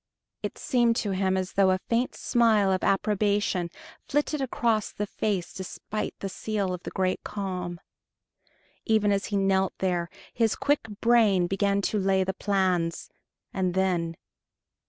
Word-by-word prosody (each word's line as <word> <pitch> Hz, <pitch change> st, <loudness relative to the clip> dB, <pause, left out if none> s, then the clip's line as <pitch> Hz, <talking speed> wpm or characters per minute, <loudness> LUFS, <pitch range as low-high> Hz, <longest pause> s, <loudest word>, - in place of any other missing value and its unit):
It -, -, -4 dB
seemed 240 Hz, -3 st, +2 dB
to 210 Hz, -3 st, -1 dB
him 190 Hz, 0 st, +1 dB
as 185 Hz, 0 st, -3 dB
though 195 Hz, -1 st, +4 dB
a 185 Hz, -, +3 dB
faint 235 Hz, +6 st, -1 dB
smile 220 Hz, -5 st, +3 dB
of 185 Hz, -, 0 dB
approbation 200 Hz, -2 st, +1 dB, 0.4 s
flitted 295 Hz, +1 st, 0 dB
across 230 Hz, -4 st, 0 dB
the 210 Hz, -, -3 dB
face 200 Hz, -3 st, -2 dB
despite 195 Hz, +3 st, -5 dB
the 195 Hz, -, -2 dB
seal 200 Hz, -1 st, -2 dB
of 180 Hz, -, -5 dB
the -, -, -6 dB
Great 185 Hz, -1 st, -1 dB
Calm. 180 Hz, -4 st, -4 dB, 1.0 s
Even 215 Hz, -2 st, +2 dB
as 200 Hz, -1 st, +1 dB
he 205 Hz, -, -1 dB
knelt 190 Hz, -1 st, +1 dB
there, 175 Hz, -2 st, -1 dB, 0.2 s
his 225 Hz, -2 st, +2 dB
quick 285 Hz, -4 st, 0 dB
brain 220 Hz, -6 st, +4 dB
began 200 Hz, +2 st, +1 dB
to 210 Hz, -, 0 dB
lay 190 Hz, 0 st, +2 dB
the 190 Hz, +1 st, -2 dB
plans 185 Hz, -4 st, 0 dB, 0.4 s
and 185 Hz, -2 st, -1 dB
then 175 Hz, -3 st, 0 dB
195 Hz, 150 wpm, -27 LUFS, 185-215 Hz, 1.0 s, though